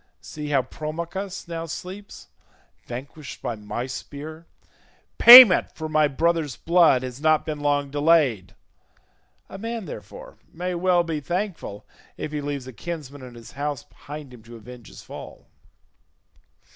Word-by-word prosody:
See 150 -1 -8
how 140 -3 +1
Promachus 170 +8 -6
now 165 -1 -5
sleeps, 190 +5 -9 0.6
vanquished 140 +4 -8
by 120 - -3
my 105 +3 -5
spear; 155 +5 -9 0.7
payment 240 -5 +10
for 160 - -5
my 155 -1 +2
brother's 155 -1 -1
blood 165 -7 +3
has 130 +1 -7
not 155 0 +2
been 155 -2 -4
long 145 -1 0
delayed; 145 - +2 0.9
a 195 - -10
man, 230 -1 -5
therefore, - - -11
may 180 +2 -4
well 175 0 +2
be 165 -3 -3
thankful 175 - -5 0.3
if 150 - -5
he 150 -1 -3
leaves 140 -2 -5
a 130 - -10
kinsman 145 -1 -7
in 125 -2 -11
his 115 -1 -12
house 145 0 -4
behind 145 -3 -11
him 120 - -14
to 115 +2 -13
avenge 120 +1 -13
his - - -13
fall." - - -11
150 Hz, 145 wpm, -23 LUFS, 135-170 Hz, 0.9 s, payment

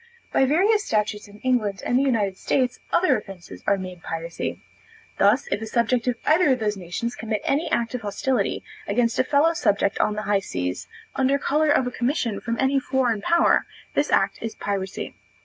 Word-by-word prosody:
By 265 - +4
various 400 +10 +3
statutes 210 - -1
in 205 0 -14
England 215 -7 0
and 245 - +1
the 260 - +4
United 220 -8 +1
States, 255 +4 0
other 365 +1 +4
offences 195 -4 -11
are 200 - +4
made 185 -2 -7
piracy. 165 +1 -4 0.6
Thus, 210 +8 +4
if 205 - 0
a 220 - -4
subject 235 +2 +1
of 250 - +2
either 310 -2 +4
of 250 - -2
these 210 -1 0
nations 190 +6 -4
commit 220 -1 -2
any 290 +4 0
act 235 0 0
of 250 - -3
hostility 215 +1 -1 0.2
against 230 +2 +1
a - - +5
fellow 295 +4 +3
subject 200 -8 +1
on 210 - +1
the 215 - -3
high 205 -1 +2
seas, 90 - -4 0.3
under 270 +1 +2
color 300 +2 +1
of 275 -3 +3
a 250 - -2
commission 245 -4 -1
from 230 0 -2
any 270 +1 +3
foreign 255 -5 0
power, 340 +9 +3 0.3
this - - +1
act - - +2
is 225 -1 -4
piracy. 195 -2 -4
230 Hz, 190 wpm, -24 LUFS, 205-265 Hz, 0.6 s, a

